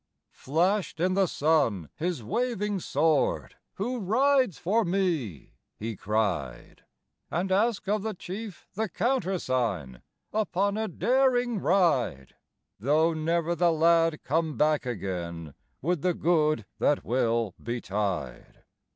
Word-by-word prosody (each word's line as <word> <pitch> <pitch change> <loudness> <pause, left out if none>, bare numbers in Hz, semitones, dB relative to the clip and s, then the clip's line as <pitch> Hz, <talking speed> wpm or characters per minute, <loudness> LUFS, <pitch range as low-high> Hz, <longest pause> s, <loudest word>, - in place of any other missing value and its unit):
Flashed 175 +4 0
in 185 +2 +2
the 195 0 +3
sun 140 - +1
his 165 -6 -3
waving 210 - -1
sword; 160 -3 +1 0.2
"Who 245 +5 -2
rides 255 - +2
for 215 +6 +1
me?" 170 - -1 0.2
he 110 +1 -4
cried, 95 - -2 0.5
"And 185 +3 -1
ask 210 +2 +1
of 210 +1 +1
the 220 0 -3
Chief 195 +1 -8
the 215 +1 -2
countersign, 130 - -1 0.3
Upon 200 -1 0
a 220 0 -1
daring 245 -2 +2
ride; 150 - +1 0.5
Though 155 +8 +3
never 165 +2 0
the 175 0 +3
lad 165 0 +3
come 155 -1 0
back 150 -2 +2
again 85 - -4 0.3
With 175 0 0
the 180 0 +1
good 155 -3 +2
that 145 - +2
will 115 -4 +1
betide. 100 - -4
165 Hz, 115 wpm, -27 LUFS, 120-195 Hz, 0.5 s, the